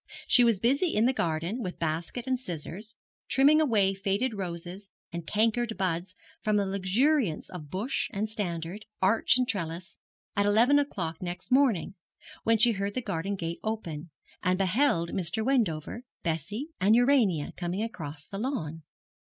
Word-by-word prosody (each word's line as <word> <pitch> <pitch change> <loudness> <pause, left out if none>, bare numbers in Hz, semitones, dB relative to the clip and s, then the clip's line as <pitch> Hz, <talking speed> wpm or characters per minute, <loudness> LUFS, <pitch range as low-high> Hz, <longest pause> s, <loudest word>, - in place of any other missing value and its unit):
She 245 - +6
was 230 -5 +3
busy 280 - +2
in 215 +2 +4
the 260 - +3
garden, 170 +4 -1
with 180 -5 -4
basket 165 +9 -3
and 260 -1 0
scissors, 195 - -7 0.3
trimming 290 +4 +5
away 210 -9 +3
fading 200 +5 -1
roses 185 +1 -6 0.2
and 170 -2 -5
cankered 225 +2 +1
buds 185 0 -2 0.3
from 215 -1 +1
the 200 -1 +2
luxuriance 200 - +1
of 155 -5 -8
bush 205 - -2
and 210 +1 -1
standard, 190 -2 -4
arch 225 +4 +4
and 250 -1 +1
trellis, 170 -5 -4 0.4
at 200 0 +2
eleven 235 +8 +5
o'clock 170 - -3
next 180 +5 -6
morning, 250 - +3 0.5
when 225 0 +4
she 235 +2 +5
heard 200 -1 -3
the 255 - 0
garden 195 +2 -2
gate 170 -2 -4
open, 170 -8 -4 0.3
and 185 0 +2
beheld 190 -3 +2
Mr. 190 +5 -1
Wendover, 230 - 0 0.2
Bessie, 190 - -3
and 200 +4 +5
Urania 235 - +3
coming 180 +4 -2
across 155 -9 -6
the 195 - -7
lawn. 165 - -3
200 Hz, 155 wpm, -28 LUFS, 170-230 Hz, 0.5 s, She